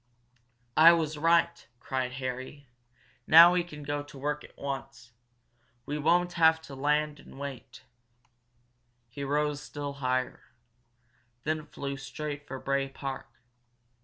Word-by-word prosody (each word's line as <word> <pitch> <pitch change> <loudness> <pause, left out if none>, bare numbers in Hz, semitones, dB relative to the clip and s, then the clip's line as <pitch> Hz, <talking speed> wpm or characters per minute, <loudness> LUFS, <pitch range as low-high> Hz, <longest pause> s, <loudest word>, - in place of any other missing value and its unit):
"I 165 +2 +9
was 160 -2 -1
right!" 170 +1 +2
cried 130 -1 -3
Harry. 130 +2 -6 0.6
"Now 170 +2 +9
we 180 -1 +2
can 150 -4 -10
go 145 0 -2
to 145 -1 -12
work 150 +2 -3
at - - -16
once 135 -3 -6 0.7
we 150 +1 -3
won't 175 +4 +2
have 160 -1 +5
to 140 - -11
land 150 +2 0
and - - -14
wait!" 135 -5 -8 1.3
He 140 +4 -7
rose 145 +1 0
still 145 -1 -6
higher, 130 0 -1 1.0
then 155 0 -2
flew 140 0 -5
straight 145 +1 -6
for 135 - -6
Bray 135 +1 -1
Park. 135 0 -6
145 Hz, 130 wpm, -29 LUFS, 135-155 Hz, 1.3 s, I